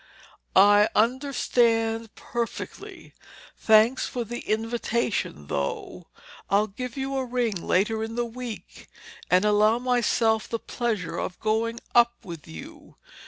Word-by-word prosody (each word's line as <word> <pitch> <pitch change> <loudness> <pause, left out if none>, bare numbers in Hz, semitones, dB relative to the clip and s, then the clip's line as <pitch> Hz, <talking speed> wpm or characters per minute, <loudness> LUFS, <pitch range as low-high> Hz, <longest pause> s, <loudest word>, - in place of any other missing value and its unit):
"I 205 +2 +6
understand 230 -2 +1
perfectly. 235 -1 -6 0.4
Thanks 220 +4 +4
for 245 - -3
the 240 +2 -5
invitation, 225 - -2
though. 70 -1 -4 0.4
I'll 200 +2 +3
give 250 +5 -7
you 270 0 -3
a 265 - 0
ring 245 -3 -1
later 200 +5 0
in 225 +1 -5
the 240 0 0
week 235 -1 -8 0.4
and 185 +3 +4
allow 210 +2 +4
myself 240 -3 +1
the 230 - -1
pleasure 215 -8 -3
of 180 - -5
going 225 +2 -1
up 240 0 +5
with 170 -5 -9
you. 80 0 -11
225 Hz, 120 wpm, -25 LUFS, 210-240 Hz, 0.4 s, I